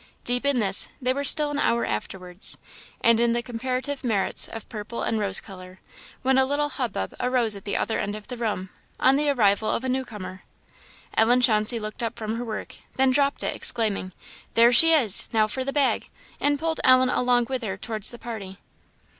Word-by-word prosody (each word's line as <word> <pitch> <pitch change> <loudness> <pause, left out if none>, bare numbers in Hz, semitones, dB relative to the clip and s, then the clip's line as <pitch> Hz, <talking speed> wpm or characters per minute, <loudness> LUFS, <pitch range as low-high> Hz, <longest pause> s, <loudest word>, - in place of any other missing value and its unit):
Deep 245 +3 0
in 280 -2 +1
this, 195 -3 +4
they 255 -1 0
were 280 +1 -3
still 295 +1 +3
an 290 - -3
hour 235 -4 +1
afterwards, 180 - -4 0.4
and 230 -1 +4
in 235 0 +2
the 235 0 -2
comparative 255 +3 -4
merits 220 -6 0
of 225 -2 -9
purple 215 +1 -6
and 225 - -1
rose 200 -2 +3
colour, 185 -2 -12 0.4
when 265 0 +3
a - - +5
little 290 +2 -1
hubbub 230 - -4
arose 245 -4 +1
at 200 - -11
the 200 - -2
other 225 - -2
end 205 +1 -3
of 215 -1 -10
the 250 - -6
room, 210 -5 -3 0.3
on 265 - +4
the 295 +1 +1
arrival 215 -5 +2
of 235 - -1
a - - -3
new 260 +1 -1
comer. 185 -6 -9 0.7
Ellen 240 +3 +4
Chauncey 230 -1 +3
looked 215 +1 -6
up 230 0 -4
from 220 +1 -4
her 240 - -4
work, 220 -2 -7 0.2
then 265 0 +3
dropped 280 +1 +1
it, - - -2
exclaiming, 215 -5 -1 0.4
"There 235 +1 +6
she 325 +7 +10
is! 250 - +3
now 220 -1 +3
for 260 +5 -4
the 275 - -3
bag!" 280 -1 0 0.3
and 290 0 +2
pulled 320 +1 -2
Ellen 255 0 +5
along 245 -1 +1
with 260 0 -3
her 200 -4 -4
towards 215 0 0
the 240 - -3
party. 210 -6 -8
235 Hz, 205 wpm, -24 LUFS, 210-260 Hz, 0.7 s, she